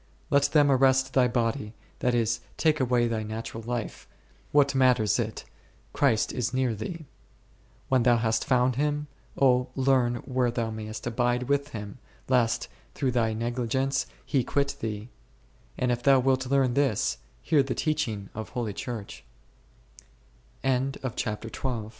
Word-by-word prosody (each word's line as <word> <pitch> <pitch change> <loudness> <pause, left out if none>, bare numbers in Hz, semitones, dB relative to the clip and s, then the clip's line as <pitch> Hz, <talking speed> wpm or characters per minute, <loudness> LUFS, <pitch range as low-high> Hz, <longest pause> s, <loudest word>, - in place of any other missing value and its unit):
Let 140 -1 +4
them 145 -2 +4
arrest 130 0 +3
thy 130 -2 +4
body, 115 -2 -1 0.2
that 125 -1 +1
is, 115 0 +1 0.2
take 155 -1 +2
away 125 -2 +2
thy 115 -1 -1
natural 110 +1 -5
life, 120 0 -5 0.4
what 145 -1 +4
matters 125 -6 +3
it, - - -3 0.5
Christ 125 -7 +2
is 125 0 -2
near 130 -3 +1
thee. 155 - -6 0.8
When 130 -1 +3
thou 120 0 +4
hast 115 -1 +1
found 125 -1 +2
Him, 150 +1 0 0.3
O 125 -2 +4
then 135 - -1
learn 125 -3 +3
where 125 -1 +1
thou 115 -1 -2
mayest 110 0 -6
abide 120 +1 0
with 140 +2 0
Him, 105 -4 -8 0.3
lest, 120 -2 +2 0.3
through 130 - 0
thy 115 -3 +1
negligence, 120 +4 -1 0.2
He 135 -3 +1
quit 140 +3 0
thee; 110 0 -4 0.7
and 125 -1 +1
if 120 0 -1
thou 135 +1 +5
wilt 130 0 +1
learn 135 -2 +3
this, 135 -6 +1 0.2
hear 150 -3 +4
125 Hz, 130 wpm, -27 LUFS, 115-135 Hz, 0.8 s, thou